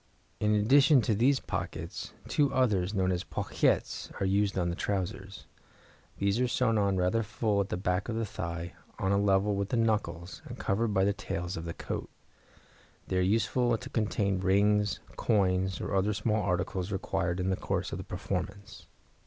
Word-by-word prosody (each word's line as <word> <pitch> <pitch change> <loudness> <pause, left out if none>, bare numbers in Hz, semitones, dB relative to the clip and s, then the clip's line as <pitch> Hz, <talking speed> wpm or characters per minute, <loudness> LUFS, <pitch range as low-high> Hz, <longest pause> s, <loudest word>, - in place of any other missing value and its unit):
In 105 0 +2
addition 135 +6 +5
to 110 - +1
these 130 +6 +3
pockets, - - -5 0.2
two 145 -2 +2
others, 100 -8 +2
known 95 -3 +1
as 90 -1 -1
pochettes, - - -1
are - - 0
used 100 +1 +1
on 85 -2 +1
the - - -3
trousers. 95 0 -3 0.7
These 100 +3 +1
are 125 - +2
sewn 115 -2 +2
on 100 -2 +2
rather 90 +5 +2
full 105 -1 0
at 100 - -3
the - - -2
back 90 +3 -1
of 115 - -2
the 115 0 -1
thigh, 85 -3 -5 0.2
on 95 - 0
a 100 - +3
level 100 0 +2
with 100 0 -2
the 120 - 0
knuckles, 105 -6 -1
and - - -8
covered 110 +4 0
by 100 -3 +2
the 100 +1 +3
tails 90 -2 -4
of 85 - -5
the 85 - -5
coat; - - -5 1.0
they 95 - 0
are - - +3
useful 115 +5 +2
to 130 +4 -9
contain 105 -4 0
rings, 100 +2 +2 0.2
coins, 95 -3 +1
or - - -4
other 100 +2 +2
small 105 0 +1
articles 90 +1 -1
required 90 -2 -1
in 95 +1 0
the - - +2
course 95 0 -2
of 95 - -4
the - - -5
performance. 100 +2 -5
100 Hz, 185 wpm, -30 LUFS, 95-110 Hz, 1.0 s, addition